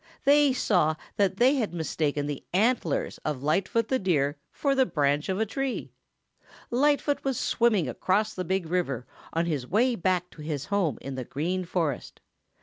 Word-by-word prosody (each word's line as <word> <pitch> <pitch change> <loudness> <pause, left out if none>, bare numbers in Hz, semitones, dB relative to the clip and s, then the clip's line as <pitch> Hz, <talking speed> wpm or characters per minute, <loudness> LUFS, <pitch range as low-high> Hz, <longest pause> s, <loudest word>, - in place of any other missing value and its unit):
They 290 0 +5
saw 175 -11 +2 0.2
that 195 -2 +2
they 260 +5 +4
had 215 -8 -1
mistaken 150 -2 -1
the 145 -2 -4
antlers 210 - +1
of 145 -4 -4
Lightfoot 195 +9 +1
the 260 - +2
Deer 145 -7 +1 0.2
for 280 -2 0
the 265 -1 +4
branch 145 +1 +1
of 190 +1 0
a 220 - +2
tree. 270 +4 -3 0.8
Lightfoot 285 +3 +2
was 270 -3 -1
swimming 215 - +2
across 200 - 0
the 185 - -3
Big 190 0 -1
River 160 -8 -1 0.3
on 165 +1 0
his 145 -7 -2
way 240 - +3
back 180 -3 0
to 155 - -12
his 150 -2 -3
home 195 - 0
in 135 - -6
the 130 -1 -4
Green 175 +9 -2
Forest. 165 -6 -2
180 Hz, 170 wpm, -27 LUFS, 150-230 Hz, 0.8 s, They